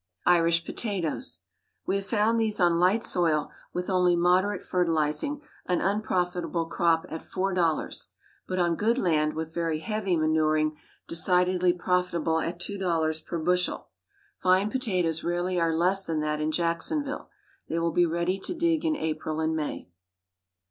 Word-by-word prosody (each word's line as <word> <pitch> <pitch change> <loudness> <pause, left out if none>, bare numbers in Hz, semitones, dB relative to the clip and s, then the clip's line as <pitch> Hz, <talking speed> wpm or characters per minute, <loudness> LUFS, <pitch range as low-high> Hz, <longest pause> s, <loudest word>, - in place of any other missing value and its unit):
IRISH 170 -1 +4
POTATOES. 200 - -3 0.4
We - - 0
have 195 0 -6
found 225 +1 +2
these 220 -2 0
on 175 -2 +3
light 190 +6 +3
soil, 160 -4 +1 0.2
with 180 0 -3
only 180 -2 +3
moderate 180 +3 +2
fertilizing, 165 - 0 0.3
an 180 -1 +1
unprofitable 180 -4 -1
crop 165 0 +1
at 160 - -5
four 195 +1 -2
dollars, 170 -4 0 0.4
but 185 - -3
on 175 -2 +2
good 225 +7 +1
land, 155 -8 +1
with 160 0 -4
very 165 -2 -1
heavy 195 +1 -1
manuring, 155 -1 +2 0.3
decidedly 180 +1 +2
profitable 175 -2 0
at 170 +2 -3
two 200 +3 -4
dollars 160 -4 0
per 170 - -5
bushel. 180 +2 0 0.5
Fine 185 +3 +3
potatoes 180 -11 -1
rarely 175 +1 0
are 165 -1 +1
less 190 +3 +2
than 160 -2 -1
that 150 0 -1
in 155 - 0
Jacksonville. 175 - -1 0.4
They 165 - -1
will 170 0 +1
be 175 +2 +3
ready 170 +3 -1
to 355 - -4
dig 335 -1 +1
in 320 -2 +1
April 155 - -3
and 160 0 0
May. 150 - -4
175 Hz, 155 wpm, -27 LUFS, 160-190 Hz, 0.5 s, IRISH